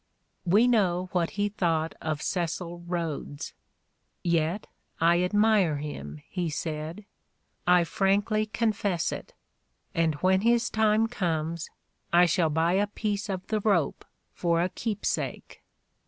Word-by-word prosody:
We 210 +8 +5
know 185 -6 +2
what 175 -2 +1
he 205 0 +2
thought 165 -5 0
of 155 -1 -2
Cecil 175 -1 -3
Ehodes, 160 -4 -4 0.7
yet 170 +3 +1 0.3
"I 170 +2 +4
admire 205 -3 +3
him," 75 - -7
he 175 -3 -2
said, 155 +5 -4 0.6
"I 180 -1 +6
frankly 205 +4 +1
con 225 +1 +1
fess 195 -5 -1
it; - - -7 0.6
and 165 -2 +1
when 190 +5 +2
his 235 +1 +2
time 220 0 +3
comes, 170 -7 -2 0.4
I 175 +1 +6
shall 165 -1 +2
buy 160 +3 +2
a 200 +2 +2
piece 210 0 -3
of 190 -2 -3
the 215 - -1
rope 195 -8 +1 0.3
for 170 -1 +1
a 180 - 0
keepsake." 210 +2 -3
180 Hz, 130 wpm, -27 LUFS, 165-205 Hz, 0.7 s, I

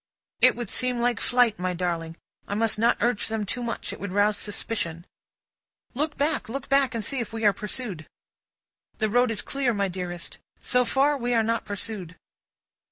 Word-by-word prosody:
"It - - +7
would 240 -4 -4
seem 250 -1 +2
like 240 -1 +1
flight, 245 -4 +3
my 180 0 -1
darling. 170 -2 -2 0.3
I 200 - -2
must 220 0 +3
not 235 +2 +4
urge 240 -3 +1
them 220 -1 -2
too 245 +5 -3
much; 235 -1 -3
it - - -9
would 200 -2 -5
rouse 205 +2 +3
suspicion." 190 -6 -3 0.9
"Look 300 +4 -1
back, 295 -3 0
look 275 +4 -5
back, 275 -2 +3
and 220 -2 -2
see 275 - 0
if 230 -1 -4
we 225 -1 -2
are 205 - +6
pursued!" 210 -6 -4 0.9
"The 220 -1 +1
road 245 +3 +3
is 225 - -1
clear, 265 -4 0
my 200 -1 0
dearest. 175 -1 -6 0.2
So 250 -1 +2
far, 280 +4 +3
we 245 -2 -1
are 225 - +4
not 230 +1 -1
pursued." 200 -4 -5
225 Hz, 185 wpm, -26 LUFS, 200-245 Hz, 0.9 s, It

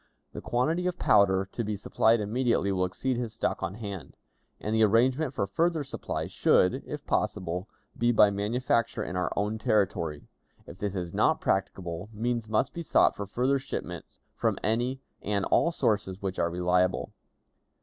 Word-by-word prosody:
"The - - -6
quantity 160 +9 0
of 180 - -2
powder 95 -2 +4
to 120 - -3
be 105 -1 -2
supplied 110 +2 +2
immediately 115 -1 +1
will 90 -1 +1
exceed 125 +7 -2
his 120 -3 -3
stock - - -2
on 90 - -3
hand, 100 -5 -7 0.4
and 105 - -3
the 110 - +3
arrangement 125 +7 +3
for 130 -7 -1
further 160 - 0
supply 135 - -4
should, 90 - +2
if - - -6
possible, 90 +2 -1 0.3
be 120 0 +2
by 105 -3 +6
manufacture 115 +2 0
in 90 - -5
our 90 - -1
own 105 +2 -1
territory; 95 - 0 0.4
if 95 - -12
this 100 -1 -2
is 90 -2 -4
not - - +3
practicable, 95 -1 -2
means 115 +1 -2
must 110 +5 +1
be 170 - -5
sought 165 - +3
for 100 - -5
further 130 +6 +1
shipments 90 -9 -7
from - - 0
any 120 +4 0 0.2
and 100 -1 -1
all 170 - +3
sources 100 - 0
which 95 -2 -4
are 85 - +2
reliable. 90 +1 +1
105 Hz, 170 wpm, -28 LUFS, 95-120 Hz, 0.4 s, by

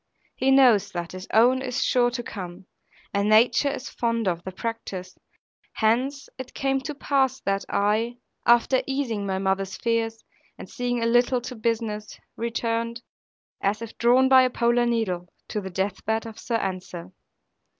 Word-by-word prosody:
He 265 - +1
knows 255 -7 +5
that 170 -1 -4
his 185 +1 -8
own 245 +4 +4
is 260 0 -1
sure 245 -1 +3
to 240 0 -4
come; 185 -3 -8 0.5
and 200 +1 +1
nature 230 +5 +5
is 275 - -5
fond 230 -2 -1
of 170 -2 -1
the 190 - -6
practice. 185 -3 -5 0.6
Hence 255 +6 0
it 260 -1 -8
came 270 -1 0
to 300 +2 -5
pass 270 -2 +1
that 195 0 -1
I, 215 +4 +1 0.3
after 240 +2 +4
easing 245 -7 -2
my 190 -1 -1
mother's 190 0 -1
fears, 225 -1 -1 0.3
and - - -9
seeing 245 -1 -2
a - - +1
little 245 +2 +3
to 250 +2 -6
business, 220 -2 -2 0.2
returned 230 0 -2 0.6
(as 200 +2 0
if 230 - -9
drawn 250 +3 +5
by 260 0 +7
a 255 - +3
polar 240 0 +2
needle) 185 -7 -1 0.2
to 210 - -2
the 190 - -6
death 190 +1 -3
bed 220 +1 -1
of 225 -1 -9
Sir 235 - -2
Ensor. 185 -3 -4
230 Hz, 165 wpm, -25 LUFS, 200-245 Hz, 0.6 s, by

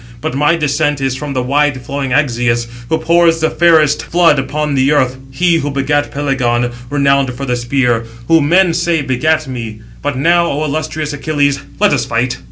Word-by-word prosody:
But 120 - -4
my 150 +5 +2
descent 145 -2 0
is 135 -1 -1
from 145 +1 -5
the 130 -1 -1
wide 145 +1 +1
flowing 140 0 -3
Axius, 120 -3 +1 0.2
who 160 - +1
pours 165 0 +2
the 160 0 0
fairest 160 -4 +3
flood 170 -4 +3
upon 145 +2 -2
the 135 +1 +2
earth, 130 -3 +1
he 165 +6 +1
who 145 -2 -2
begat 145 +1 0
Pelegon, 125 -4 -1 0.2
renowned 140 -2 +1
for 140 +2 -5
the 125 -2 -1
spear; 120 -1 0 0.2
who, 165 -1 +4
men 175 +4 +3
say, 170 -2 0
begat 155 +4 0
me. 115 -4 -6 0.2
But 145 -2 -2
now, 170 +4 +3
O 150 0 -2
illustrious 155 0 -3
Achilles, 145 -1 0 0.2
let 210 0 +3
us - - 0
fight." 120 +2 -2
145 Hz, 180 wpm, -14 LUFS, 130-155 Hz, 0.2 s, who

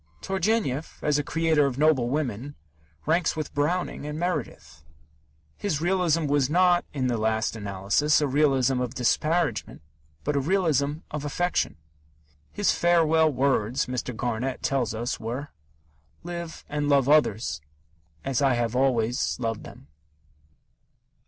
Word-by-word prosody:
Turgenev, 190 - -1
as 150 -1 +2
a - - -1
creator 160 -2 +2
of 130 -2 -4
noble 145 -5 +3
women, 140 -1 -3 0.5
ranks 165 +3 +1
with 155 -2 -5
Browning 165 +5 -1
and 150 0 -4
Meredith. 155 - -4 0.7
His 180 -8 -1
realism 170 -2 +1
was 140 -2 +2
not, 175 +1 +4
in 135 -3 -2
the 120 -3 0
last 110 +2 0
analysis, 100 +8 +1
a 150 - +1
realism 135 -2 +2
of 125 +1 -3
disparagement, 155 - 0 0.4
but 150 - -1
a - - +3
realism 150 -3 +1 0.2
of 150 -1 -4
affection. 175 +5 -1 0.8
His 205 - +1
farewell 160 -2 +3
words, 130 -2 +1
Mr. 125 -1 -4
Garnett 125 +2 -2
tells 125 -5 0
us, 120 +2 -3
were: 125 +6 -5 0.7
"Live 170 -1 -7
and 145 0 -2
love 140 -2 +4
others 110 - +2 0.6
as 135 0 0
I 135 -3 +3
have 120 0 -1
always 125 -1 +1
loved 115 -3 -3
them." - - -12
140 Hz, 135 wpm, -26 LUFS, 125-160 Hz, 0.8 s, not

